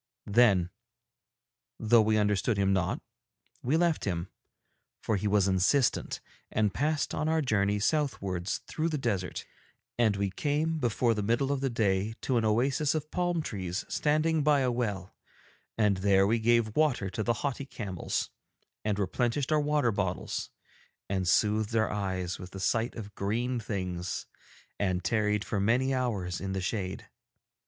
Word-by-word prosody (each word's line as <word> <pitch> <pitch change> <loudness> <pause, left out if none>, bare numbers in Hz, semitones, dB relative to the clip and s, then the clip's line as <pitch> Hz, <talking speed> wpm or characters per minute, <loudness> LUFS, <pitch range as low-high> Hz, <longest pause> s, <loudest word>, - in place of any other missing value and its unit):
Then, 100 -5 +4 1.1
though 115 +1 +5
we 110 0 +2
understood 105 +1 +1
him 100 -1 +2
not, 95 -3 -1 0.6
we 140 +6 +1
left 170 -2 +1
him, 90 -2 -2 0.7
for 110 - -1
he 100 +1 -1
was 100 -1 +3
insistent, 95 +8 +2 0.3
and 105 -3 +1
passed 150 +2 0
on 155 +1 -1
our 160 0 +2
journey 105 -4 +1
southwards 100 - -1
through 160 +1 -2
the 155 - -1
desert, 100 -9 -2 0.5
and 110 -4 +3
we 100 -1 -1
came 155 +8 0
before 120 -2 +2
the 105 - -2
middle 120 +6 +1
of 140 -2 -1
the 135 - +1
day 105 -2 0
to 130 - +1
an 115 - +1
oasis 135 +7 +2
of 155 0 -3
palm 175 -2 0
trees 95 - -4
standing 155 +1 +1
by 145 -1 +4
a 125 -1 +2
well 105 -6 -3 0.6
and 105 -3 +3
there 95 0 +4
we 115 +3 +2
gave 115 -1 +2
water 130 -11 +1
to 105 - -3
the 120 +2 +1
haughty 140 0 -2
camels 95 -9 -3 0.5
and 105 -2 0
replenished 120 - 0
our 155 -1 +4
water 145 -4 +2
bottles 95 -3 -2 0.6
and 95 -2 0
soothed 105 +4 +2
our 110 -1 +2
eyes 95 -3 -2
with 90 - -8
the 95 - -8
sight 115 +5 0
of 105 -3 -8
green 120 +6 -1
things 90 -5 -3 0.5
and 95 -3 0
tarried 105 0 +1
for 105 - -2
many 125 +6 +2
hours 105 -9 -2
in 95 0 -3
the 95 - -1
shade. 95 -1 -3
110 Hz, 160 wpm, -29 LUFS, 95-130 Hz, 1.1 s, though